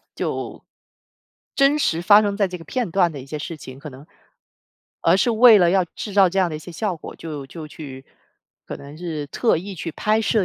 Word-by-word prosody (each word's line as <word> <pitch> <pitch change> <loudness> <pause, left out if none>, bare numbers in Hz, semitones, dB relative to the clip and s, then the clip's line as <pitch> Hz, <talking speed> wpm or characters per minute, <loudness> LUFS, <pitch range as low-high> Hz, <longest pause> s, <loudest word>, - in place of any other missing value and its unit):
就 - - -4 0.9
真 275 +2 +3
实 170 - +1
发 205 +3 +7
生 200 -1 -1
在 200 -3 +1
这 180 - -6
个 165 - -12
片 245 -2 -3
段 175 -2 +2
的 140 - -7
一 130 - -11
些 150 +2 -5
事 165 +2 -6
情， 130 -3 -11
可 150 +2 -9
能 135 +3 -13 1.0
而 - - +4
是 235 - +2
为 230 -1 +7
了 175 -2 +4
要 190 0 +3
制 200 +4 -8
造 195 -2 +5
这 190 +3 -2
样 185 -2 +3
的 155 - -4
一 - - -6
些 170 +3 -11
效 190 +1 -2
果， 160 - -10
就 150 -4 -7
就 155 +2 -9
去 135 -4 -10 0.6
可 - - -6
能 140 +2 -12
是 160 -3 -5
特 225 - +1
意 190 +4 -6
去 165 -1 -6
拍 215 +7 +1
摄 220 -2 +1
175 Hz, 240 characters per minute, -22 LUFS, 155-205 Hz, 1.0 s, 发